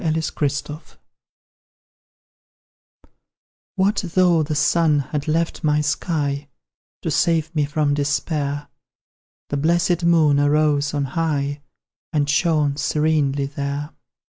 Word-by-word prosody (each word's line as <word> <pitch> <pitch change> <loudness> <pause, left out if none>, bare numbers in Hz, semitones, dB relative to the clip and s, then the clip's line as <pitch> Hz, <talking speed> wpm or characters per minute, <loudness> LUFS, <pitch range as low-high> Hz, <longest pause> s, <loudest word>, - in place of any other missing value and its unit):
FLUCTUATIONS, 155 -1 -3 2.8
What 200 +2 +1 0.2
though 180 -3 +4
the 155 0 -2
Sun 160 0 +3
had 145 +1 -3
left 165 +2 -1
my 150 -1 +2
sky; 145 -2 -2 0.6
To - - -1
save 160 -1 +1
me 150 -2 +1
from 145 0 0
despair 145 0 -1 0.8
The 145 - -1
blessed 175 +3 +1
Moon 160 -4 +4
arose 145 0 +2
on 140 -1 0
high, 145 -1 -2 0.5
And 145 -2 +1
shone 150 -1 +1
serenely 145 -1 +1
there. 140 +1 -4
150 Hz, 100 wpm, -21 LUFS, 145-160 Hz, 2.8 s, though